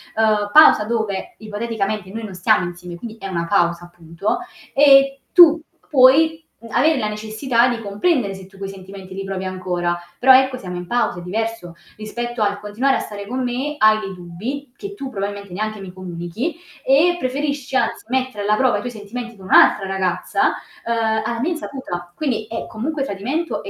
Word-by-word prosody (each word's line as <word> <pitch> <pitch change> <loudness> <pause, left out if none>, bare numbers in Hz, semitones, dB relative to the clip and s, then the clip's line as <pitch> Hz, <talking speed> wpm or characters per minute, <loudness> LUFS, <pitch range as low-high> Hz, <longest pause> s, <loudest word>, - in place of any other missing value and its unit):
uhm, 215 -2 +2
pausa 310 -8 +8
dove 220 - -2
ipoteticamente 215 -2 -3
noi 225 +2 -6
non 195 -3 -7
stiamo 180 0 +2
insieme, 175 0 -8
quindi 220 +4 -9
è 195 - -7
una 170 -3 -2
pausa 170 +1 +1
appunto 175 - -4 0.4
e 275 -1 +6
tu 335 -2 +8 0.3
puoi 315 +4 +5 0.2
m 230 - -11
avere 300 +7 +3
la 215 - -1
necessità 220 +4 +1
di 240 -1 -2
comprendere 210 - 0
se 190 -1 -10
tu 195 +1 -18
quei 195 0 -5
sentimenti 190 0 -10
li 195 - -4
provi 195 -1 -4
ancora, 180 -2 -2 0.2
però 260 +1 +7
ecco, 260 -1 +1
siamo 180 -6 -7
in 175 0 -6
pausa, 235 -5 0
è - - -8
diverso 220 0 -4 0.2
rispetto 240 +2 -5
al 205 -1 +1
continuare 215 +7 0
a - - -2
stare 205 -1 -7
con 255 +4 -3
me, 260 +5 -2
hai 215 -2 +5
dei 195 -2 -6
dubbi 220 +11 -7
che 400 +6 -7
tu 275 -9 -6
probabilmente 200 -3 -5
neanche 215 +2 -3
mi 190 -2 -9
comunichi 185 - -5 0.3
e 305 +7 +4
preferisci 280 -1 -2
anzi - - -1
mettere 255 -5 -1
alla 210 +1 +2
prova 255 0 +3
i - - 0
tuoi 245 - -5
sentimenti 235 +2 -8
con 190 - -13
un'altra 195 +1 +5
ragazza, 190 -2 0 0.3
uhm, 225 -1 0
alla 235 +1 -2
mia 305 +9 0
insaputa, 260 - -6
quindi 250 - -2
è 230 - -4
comunque 275 +6 -3
tradimento 270 - -3
e - - -7
215 Hz, 185 wpm, -20 LUFS, 195-260 Hz, 0.4 s, pausa